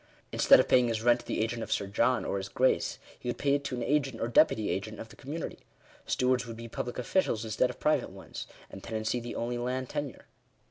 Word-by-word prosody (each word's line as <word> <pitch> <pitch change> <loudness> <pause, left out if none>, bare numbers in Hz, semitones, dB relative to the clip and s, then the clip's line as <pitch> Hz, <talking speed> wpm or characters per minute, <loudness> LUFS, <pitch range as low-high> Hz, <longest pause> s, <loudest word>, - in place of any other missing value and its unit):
Instead - - +7
of - - +3
paying 125 -1 +5
his 115 -1 -1
rent 120 0 +5
to - - -13
the - - -1
agent 115 +1 -1
of - - -5
Sir 100 - +1
John 115 +6 +1
or - - -1
his 95 0 -4
Grace, 130 +1 +1 0.2
he 125 - -4
would 120 - -2
pay 140 -1 +2
it 140 0 +1
to 130 - -2
an 120 - -3
agent 140 -5 0
or 115 - 0
deputy 110 -2 +4
agent 110 +2 -4
of 115 - -8
the - - -14
community. 150 +5 -6 0.5
Stewards 125 -1 +1
would 115 -1 -7
be 115 0 -7
public 120 +1 -5
officials 120 - 0
instead 110 - +1
of - - -8
private - - +2
ones; - - -8 0.2
and 95 - -9
tenancy 110 +2 -2
the 120 0 -6
only 120 +1 -2
land 125 +1 -2
tenure. 145 -6 -5
120 Hz, 235 wpm, -30 LUFS, 110-130 Hz, 0.5 s, Instead